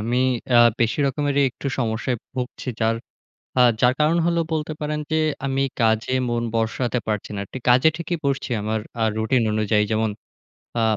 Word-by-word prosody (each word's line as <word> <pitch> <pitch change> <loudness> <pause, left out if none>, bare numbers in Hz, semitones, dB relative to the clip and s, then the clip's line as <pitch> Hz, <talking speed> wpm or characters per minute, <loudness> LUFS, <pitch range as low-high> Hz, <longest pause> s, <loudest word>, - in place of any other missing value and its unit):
আমি 120 +3 0 0.3
অ্যা 120 -1 +7 0.2
বেশি 115 +4 +1
রকমেরই 145 0 +1
একটু 140 - -8
সমস্যায় 115 +1 -1 0.2
ভুগছি। 125 +1 -5
যার 115 +1 +2 0.6
আ 125 - +7 0.2
যার 125 +1 +4
কারণ 155 +3 +3
হল 170 0 +1 0.2
বলতে 155 0 -1
পারেন, 150 0 -2
যে 160 - +2 0.3
আমি 135 0 0 0.2
কাজে 110 +2 +2
মন 120 0 0
বসাতে 115 +2 0
পারছি 105 -1 -2
না। - - -3 0.3
কাজে 125 +5 +6
ঠিকই 170 0 -3
বসছি 135 -1 -1
আমার 110 0 -1 0.2
আ - - +2
রুটিন 115 +2 +2
অনুযায়ী। 105 0 +2
যেমন 110 0 +1 0.7
আ - - +2
125 Hz, 165 wpm, -23 LUFS, 110-140 Hz, 0.7 s, অ্যা